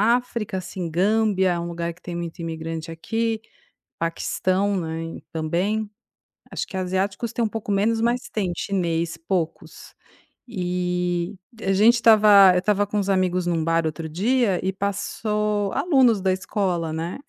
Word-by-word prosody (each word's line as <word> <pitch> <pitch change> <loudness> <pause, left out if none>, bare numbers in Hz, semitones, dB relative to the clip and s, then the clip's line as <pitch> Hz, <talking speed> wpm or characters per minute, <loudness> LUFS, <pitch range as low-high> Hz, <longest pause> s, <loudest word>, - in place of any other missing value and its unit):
África, 235 -5 -3
assim, 180 -1 -5
Gâmbia 195 +2 +2
é 170 - -2
um 170 - -4
lugar 170 0 -3
que 175 - -25
tem 175 - -6
muito 170 -1 -5
imigrante 165 -1 -5
aqui, 225 +7 -2 0.6
Paquistão, 185 +4 0
né, 165 0 -5
também, 180 +7 -1 0.6
acho - - -3
que - - -8
asiáticos 190 +5 -1
têm 235 - +1
um - - +1
pouco 215 -1 -5
menos, 215 +3 +2
mas 240 +2 +1
tem 195 -5 -1
chinês, 170 -4 -1
poucos. 165 -1 -4 0.6
E, 180 -1 -1 0.2
e - - -8
a 195 - +2
gente 215 +5 +6
estava 210 -4 +7
eu - - +4
estava 205 +2 +1
com 210 - -2
uns 200 -1 0
amigos 185 -2 +1
em 175 - 0
um 165 -2 0
bar 165 0 +1
outro 160 +1 -4
dia 205 +3 +1
e 190 - 0
passou 205 +1 -1
alunos 260 - +3
da 190 0 +2
escola, 185 -3 -1
né? 165 +7 -4
190 Hz, 160 wpm, -23 LUFS, 170-210 Hz, 0.6 s, estava